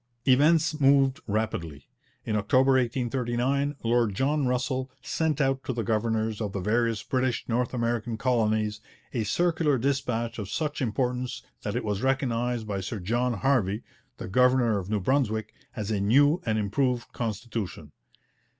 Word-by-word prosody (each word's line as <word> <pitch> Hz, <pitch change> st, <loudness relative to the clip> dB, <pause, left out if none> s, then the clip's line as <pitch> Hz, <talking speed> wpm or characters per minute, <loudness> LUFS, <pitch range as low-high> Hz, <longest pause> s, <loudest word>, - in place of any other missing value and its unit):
Events 155 Hz, +4 st, +4 dB
moved 135 Hz, 0 st, +4 dB
rapidly. 100 Hz, -9 st, -3 dB, 0.4 s
In 110 Hz, -, -1 dB
October 130 Hz, +6 st, +3 dB
1839 130 Hz, +2 st, 0 dB
Lord 115 Hz, -3 st, +2 dB
John 140 Hz, +3 st, +1 dB
Russell 130 Hz, +1 st, -1 dB
sent 155 Hz, -2 st, -1 dB
out 135 Hz, -1 st, +1 dB
to 130 Hz, -, -2 dB
the 115 Hz, -1 st, -2 dB
governors 110 Hz, +1 st, 0 dB
of 105 Hz, -3 st, -3 dB
the 100 Hz, -, -2 dB
various 110 Hz, +2 st, 0 dB
British 130 Hz, 0 st, -1 dB
North 125 Hz, +1 st, 0 dB
American 120 Hz, -2 st, -1 dB
colonies 110 Hz, -3 st, 0 dB, 0.3 s
a 120 Hz, -4 st, 0 dB
circular 160 Hz, -, +1 dB
dispatch 120 Hz, -3 st, -1 dB
of 100 Hz, -2 st, -5 dB
such 150 Hz, +5 st, -2 dB
importance 125 Hz, +1 st, -2 dB, 0.2 s
that -, -, -3 dB
it -, -, -1 dB
was 105 Hz, -1 st, -2 dB
recognized 125 Hz, -3 st, 0 dB
by 100 Hz, -2 st, -2 dB
Sir 105 Hz, +4 st, -4 dB
John 120 Hz, +7 st, 0 dB
Harvey, 110 Hz, -4 st, +1 dB, 0.3 s
the -, -, -6 dB
governor 125 Hz, 0 st, +3 dB
of 95 Hz, 0 st, -7 dB
New 105 Hz, -1 st, +1 dB
Brunswick, 110 Hz, -1 st, 0 dB, 0.2 s
as 105 Hz, 0 st, -3 dB
'a 105 Hz, -, 0 dB
new 145 Hz, -, +4 dB
and 110 Hz, -1 st, +1 dB
improved 120 Hz, +4 st, -1 dB
constitution.' 110 Hz, -8 st, -4 dB
120 Hz, 150 wpm, -27 LUFS, 110-130 Hz, 0.4 s, Events